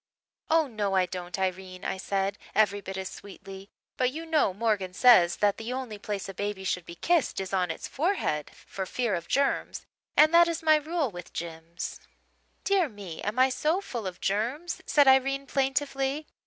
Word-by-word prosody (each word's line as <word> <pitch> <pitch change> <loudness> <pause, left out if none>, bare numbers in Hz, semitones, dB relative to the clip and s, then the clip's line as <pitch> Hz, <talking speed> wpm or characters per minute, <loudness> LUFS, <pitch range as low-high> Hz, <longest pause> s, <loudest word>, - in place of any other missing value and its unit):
"'Oh, 320 0 +4
no, 210 -6 -2
I 185 -1 +4
don't, 180 0 -6
Irene,' 185 -1 -3
I - - -2
said 195 +1 -2 0.2
every 205 -2 +3
bit 190 0 -6
as 190 0 -3
sweetly, 195 0 -10 0.3
'but 255 - +2
you 320 +4 -6
know 315 -10 +2
Morgan 195 -3 -1
says 180 -8 +6
that 205 -1 +2
the 225 +2 -5
only 250 -5 -5
place 205 -2 -4
a 195 - -6
baby 205 0 -4
should 180 -2 -2
be 170 - -8
kissed 330 - +1
is 190 0 -5
on 180 -2 +1
its 165 - -5
forehead, 280 - -1
for 190 -1 -7
fear 240 -1 -1
of 170 -2 -3
germs, 280 0 0 0.3
and 310 +2 +7
that 340 0 +7
is 335 -1 -3
my 310 -1 +6
rule 305 -3 -1
with 175 -2 -10
Jims.' 165 0 -6 0.6
"'Dear 385 -6 +2
me, 200 -7 -8
am 210 +4 -3
I 260 +1 +5
so 305 +7 +1
full 235 - -5
of 180 -1 -7
germs?' 240 - -2
said 290 -2 +5
Irene 270 +1 +4
plaintively. 275 +1 -1
210 Hz, 185 wpm, -28 LUFS, 190-275 Hz, 0.6 s, and